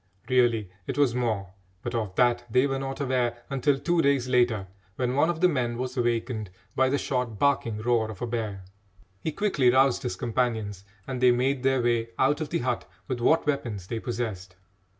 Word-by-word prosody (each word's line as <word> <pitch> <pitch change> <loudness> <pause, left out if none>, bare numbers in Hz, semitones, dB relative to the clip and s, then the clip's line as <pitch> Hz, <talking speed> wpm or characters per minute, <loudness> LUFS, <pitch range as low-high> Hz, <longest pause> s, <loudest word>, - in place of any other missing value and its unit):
Really 120 -6 +2 0.2
it - - -3
was 140 -5 +3
more, 110 -6 -1 0.3
but 120 - -4
of 110 -5 -2
that 120 -1 +3
they 125 +4 +4
were 135 -1 -1
not 135 +1 -4
aware 125 -3 0
until 135 +1 +2
two 170 +4 +1
days 140 -3 +2
later, 120 -5 +2 0.3
when 125 +1 -1
one 145 +5 +3
of 170 -1 -2
the 180 - +7
men 125 -7 -1
was 130 +1 -4
awakened 120 -3 -1 0.3
by 130 0 +3
the 140 - +1
short 125 -6 -2
barking 125 -4 +1
roar 110 0 +1
of 105 -4 -8
a - - -2
bear. 110 -5 -4 0.5
He 160 - -2
quickly 155 -9 +2
roused 130 +1 +4
his 125 - -3
companions 110 -5 -2 0.2
and 130 -1 -4
they 125 - +7
made 130 +2 +2
their 135 -1 +2
way 120 -1 +1
out 145 +4 +2
of 155 - -3
the - - 0
hut 125 -2 -2 0.2
with 130 -2 -2
what 160 +7 +3
weapons 120 -10 -2
they 115 +4 -4
possessed. 110 -7 -4
125 Hz, 195 wpm, -27 LUFS, 115-135 Hz, 0.5 s, the